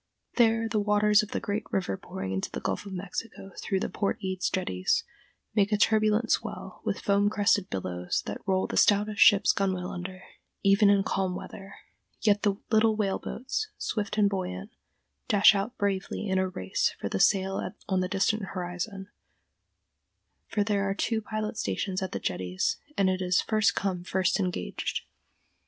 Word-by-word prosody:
There 225 Hz, -1 st, +4 dB
the 220 Hz, -1 st, 0 dB
waters 210 Hz, 0 st, +4 dB
of 215 Hz, -, -6 dB
the -, -, -2 dB
great 205 Hz, +1 st, -4 dB
river 190 Hz, -2 st, -1 dB
pouring 185 Hz, -, -6 dB
into 95 Hz, 0 st, -2 dB
the -, -, -5 dB
Gulf 105 Hz, -, -3 dB
of -, -, -8 dB
Mexico 195 Hz, +2 st, -6 dB
through 190 Hz, -2 st, -1 dB
the -, -, 0 dB
Port 200 Hz, -, -1 dB
Eads 185 Hz, -1 st, -2 dB
Jetties 95 Hz, -, 0 dB, 0.5 s
make 205 Hz, -1 st, +2 dB
a 210 Hz, -, +3 dB
turbulent 215 Hz, +1 st, +3 dB
swell -, -, -2 dB
with -, -, -2 dB
foam 200 Hz, 0 st, +3 dB
crested 200 Hz, -2 st, +2 dB
billows 90 Hz, -1 st, -2 dB
that 100 Hz, -, -5 dB
roll 190 Hz, -1 st, +2 dB
the -, -, -4 dB
stoutest 210 Hz, +1 st, +3 dB
ship's 205 Hz, -2 st, +6 dB
gunwale 185 Hz, -2 st, -1 dB
under, 185 Hz, +1 st, -7 dB, 0.4 s
even 200 Hz, +1 st, +5 dB
in 200 Hz, -1 st, +4 dB
calm 190 Hz, -2 st, -1 dB
weather; 195 Hz, +1 st, -9 dB, 0.4 s
yet 205 Hz, -1 st, +3 dB
the 205 Hz, -2 st, +2 dB, 0.2 s
little 220 Hz, 0 st, +4 dB
whale 200 Hz, -3 st, 0 dB
boats, 270 Hz, -, -3 dB
swift 210 Hz, -1 st, -3 dB
and 210 Hz, -1 st, +5 dB
buoyant, 140 Hz, -, -4 dB, 0.6 s
dash 205 Hz, +1 st, +7 dB
out 205 Hz, +5 st, -3 dB
bravely 200 Hz, +1 st, -2 dB
in 190 Hz, -1 st, +1 dB
a 190 Hz, 0 st, 0 dB
race 95 Hz, -, -1 dB
for -, -, -3 dB
the 95 Hz, -, -2 dB
sail 195 Hz, -, +3 dB, 0.3 s
on 190 Hz, -1 st, +1 dB
the 185 Hz, -, 0 dB
distant 205 Hz, +3 st, +1 dB
horizon, 185 Hz, +2 st, -4 dB, 1.4 s
for 210 Hz, -, 0 dB
there 200 Hz, -1 st, 0 dB
are 195 Hz, -, -1 dB
two 225 Hz, +1 st, 0 dB
pilot 215 Hz, 0 st, -4 dB
stations 190 Hz, -2 st, -2 dB
at 190 Hz, -, -3 dB
the -, -, -2 dB
Jetties, 90 Hz, 0 st, -1 dB, 0.2 s
and 195 Hz, -, +3 dB
it 185 Hz, 0 st, 0 dB
is 180 Hz, -1 st, +2 dB
"first 215 Hz, -4 st, +2 dB
come 185 Hz, -3 st, -2 dB
first 185 Hz, +2 st, +1 dB
engaged." 180 Hz, -, -2 dB
195 Hz, 175 wpm, -28 LUFS, 185-210 Hz, 1.4 s, dash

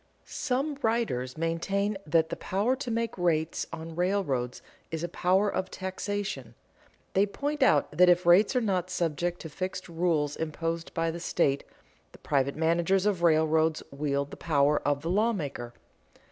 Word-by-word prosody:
_ -, -, -31 dB
Some 275 Hz, +2 st, -2 dB
writers 220 Hz, -, -1 dB
maintain 195 Hz, +6 st, -1 dB
that 160 Hz, +1 st, +3 dB
the -, -, -3 dB
power 205 Hz, +7 st, 0 dB
to 265 Hz, -2 st, -5 dB
make 230 Hz, 0 st, -1 dB
rates 165 Hz, -2 st, 0 dB
on 165 Hz, 0 st, -7 dB
railroads 170 Hz, -10 st, -1 dB, 0.3 s
is 160 Hz, 0 st, -4 dB
a -, -, 0 dB
power 185 Hz, +4 st, +2 dB
of 190 Hz, -2 st, -2 dB
taxation. 190 Hz, -, -4 dB, 0.6 s
They 200 Hz, +2 st, +3 dB
point 290 Hz, +8 st, -3 dB
out 155 Hz, -, +4 dB
that 180 Hz, +2 st, +6 dB
if 175 Hz, 0 st, +4 dB
rates 190 Hz, +8 st, +5 dB
are 250 Hz, -, +3 dB
not 185 Hz, -5 st, 0 dB
subject 175 Hz, 0 st, -1 dB
to 160 Hz, -, -7 dB
fixed 185 Hz, +3 st, -5 dB
rules 165 Hz, -4 st, 0 dB
imposed 165 Hz, +1 st, -3 dB
by 165 Hz, -1 st, +1 dB
the 170 Hz, -, -6 dB
state, 145 Hz, -5 st, +1 dB, 0.5 s
the -, -, -13 dB
private 140 Hz, -1 st, 0 dB
managers 170 Hz, +4 st, +2 dB
of 200 Hz, -4 st, +1 dB
railroads 160 Hz, -1 st, +3 dB
wield 140 Hz, 0 st, -2 dB
the -, -, -8 dB
power 150 Hz, -2 st, +2 dB
of 145 Hz, 0 st, 0 dB
the 165 Hz, -, -2 dB
lawmaker. 180 Hz, -, -1 dB
170 Hz, 160 wpm, -28 LUFS, 155-195 Hz, 0.6 s, that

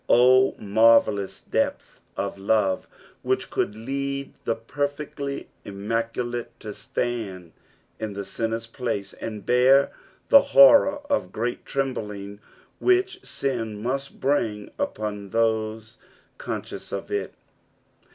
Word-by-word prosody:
Oh, 130 Hz, +2 st, +6 dB
marvellous 105 Hz, -1 st, +3 dB
depth -, -, -2 dB, 0.2 s
of -, -, -2 dB
love, 100 Hz, -1 st, +1 dB, 0.3 s
which -, -, -1 dB
could 105 Hz, -, -1 dB
lead 140 Hz, +4 st, -3 dB
the 115 Hz, -, +1 dB
perfectly 145 Hz, +3 st, -4 dB, 0.2 s
immaculate 115 Hz, +4 st, -3 dB
to 105 Hz, -1 st, -6 dB
stand 100 Hz, -10 st, -4 dB, 0.5 s
in 105 Hz, -2 st, -5 dB
ihe 100 Hz, -, -4 dB
sinner's 115 Hz, +2 st, -3 dB
place, 115 Hz, -4 st, -4 dB
and 105 Hz, -3 st, -7 dB
bear 130 Hz, +3 st, +5 dB, 0.4 s
the 280 Hz, -, +9 dB, 0.2 s
horror 285 Hz, +1 st, +8 dB
of 285 Hz, -1 st, 0 dB
great 120 Hz, +2 st, -3 dB
trembliog 105 Hz, -7 st, -3 dB, 0.4 s
which 375 Hz, 0 st, +2 dB
sin 115 Hz, -6 st, -3 dB
must 135 Hz, +3 st, -3 dB
bring 115 Hz, -7 st, 0 dB
upon 105 Hz, -2 st, -3 dB
those 110 Hz, +1 st, -1 dB, 0.4 s
conscious -, -, -6 dB
of -, -, -5 dB
it. 410 Hz, 0 st, -2 dB
115 Hz, 110 wpm, -25 LUFS, 105-135 Hz, 0.5 s, the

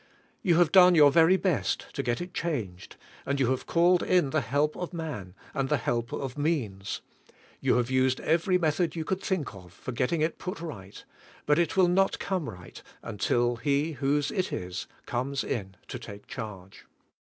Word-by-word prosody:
You 175 Hz, -6 st, +3 dB
have 170 Hz, -1 st, +4 dB
done 180 Hz, -2 st, +8 dB
your 145 Hz, -3 st, +7 dB
very 165 Hz, +5 st, +5 dB
best 185 Hz, -5 st, -1 dB
to -, -, -2 dB
get 120 Hz, +5 st, -1 dB
it 180 Hz, +1 st, -7 dB
changed, 110 Hz, -, -4 dB, 0.3 s
and 140 Hz, 0 st, -1 dB
you 130 Hz, -1 st, +2 dB
have 130 Hz, -, -2 dB
called 175 Hz, +1 st, +4 dB
in 175 Hz, -7 st, +2 dB
the 155 Hz, -, +2 dB
help 145 Hz, +4 st, 0 dB
of 180 Hz, 0 st, -5 dB
man, 145 Hz, -, -5 dB, 0.2 s
and 135 Hz, -1 st, -1 dB
the 150 Hz, -, +3 dB
help 120 Hz, -1 st, -2 dB
of 135 Hz, +1 st, -4 dB
means; 110 Hz, -, -2 dB, 0.6 s
you -, -, +2 dB
have 125 Hz, +1 st, 0 dB
used 130 Hz, 0 st, +2 dB
every 170 Hz, +3 st, +2 dB
method 160 Hz, 0 st, 0 dB
you 160 Hz, -1 st, -3 dB
coi:Id 190 Hz, +2 st, -2 dB
think 180 Hz, -, -2 dB
of 90 Hz, -3 st, -13 dB
for 85 Hz, -, -7 dB
getting 130 Hz, +6 st, 0 dB
it 160 Hz, +1 st, 0 dB
put 185 Hz, +3 st, -5 dB
right; 100 Hz, -, -8 dB, 0.4 s
but 150 Hz, +2 st, +3 dB
it 170 Hz, +1 st, 0 dB
will 185 Hz, -2 st, +6 dB
not 195 Hz, +2 st, +2 dB
come 185 Hz, -9 st, -2 dB
right 90 Hz, -4 st, -11 dB, 0.2 s
until 120 Hz, +4 st, 0 dB
He 140 Hz, +6 st, 0 dB
whose 145 Hz, +1 st, 0 dB
it 185 Hz, -2 st, -1 dB
is, 90 Hz, +1 st, -4 dB, 0.2 s
comes 130 Hz, +3 st, -2 dB
in 95 Hz, -5 st, -4 dB
to -, -, -5 dB
take 100 Hz, 0 st, -10 dB
charge. 100 Hz, -6 st, -8 dB
145 Hz, 190 wpm, -28 LUFS, 120-170 Hz, 0.6 s, done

